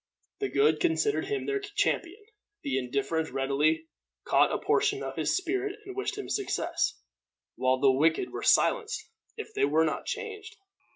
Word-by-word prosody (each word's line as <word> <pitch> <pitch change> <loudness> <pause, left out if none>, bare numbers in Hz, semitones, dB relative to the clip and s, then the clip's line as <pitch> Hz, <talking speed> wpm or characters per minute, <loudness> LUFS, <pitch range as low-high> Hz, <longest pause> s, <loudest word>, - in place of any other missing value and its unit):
The 405 - -1
good 430 +2 +3
considered 380 +4 +1
him 420 0 -2
their 410 0 0
champion, 410 -1 -2 0.4
the 135 -1 0
indifferent 140 +5 -1
readily 150 +4 +1 0.4
caught - - +4
a - - 0
portion 415 -1 +1
of - - -5
his - - +1
spirit 385 +2 -2
and 390 -1 -8
wished 400 +1 -3
him 410 - -5
success, 405 -2 -1 0.6
while 130 0 +1
the 135 -1 +5
wicked 160 - +2
were - - -5
silenced 450 -2 +2 0.3
if 440 0 -7
they - - 0
were 155 +3 +3
not 155 - -3
changed. 445 -1 -5
385 Hz, 160 wpm, -28 LUFS, -, 0.6 s, the